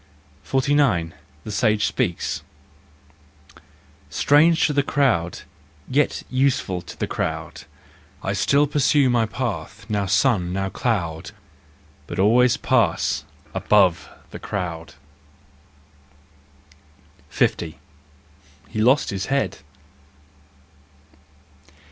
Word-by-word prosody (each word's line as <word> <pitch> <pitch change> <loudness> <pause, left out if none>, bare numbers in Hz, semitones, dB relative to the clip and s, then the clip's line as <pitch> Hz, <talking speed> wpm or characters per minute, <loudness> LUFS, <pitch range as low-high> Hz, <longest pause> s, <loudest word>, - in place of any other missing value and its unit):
49 135 - +1 0.3
The 110 - -7
Sage 105 0 +2
Speaks. 85 - -2 1.7
Strange 160 +3 +4
to 150 - 0
the 140 - +3
crowd, 125 - 0 0.5
yet 145 +2 0
useful 130 -9 0
to 85 0 -12
the - - -1
crowd, - - -4 0.6
I - - -1
still 145 +1 +3
pursue 145 -2 +2
my 115 -2 +2
path, 105 -4 -5
now 100 -2 -1
sun, 100 -3 +2
now 95 +1 -2
cloud, 85 -9 -2 0.7
But - - -6
always 120 +6 +4
pass 115 - +1 0.3
above 95 -5 +2 0.2
the - - -8
crowd! 85 -6 -5 2.3
SO. - - +3 1.2
He 110 - -3
lost 130 +6 +3
his 95 0 -3
Head. 140 +1 -1
110 Hz, 90 wpm, -22 LUFS, 90-135 Hz, 2.3 s, Strange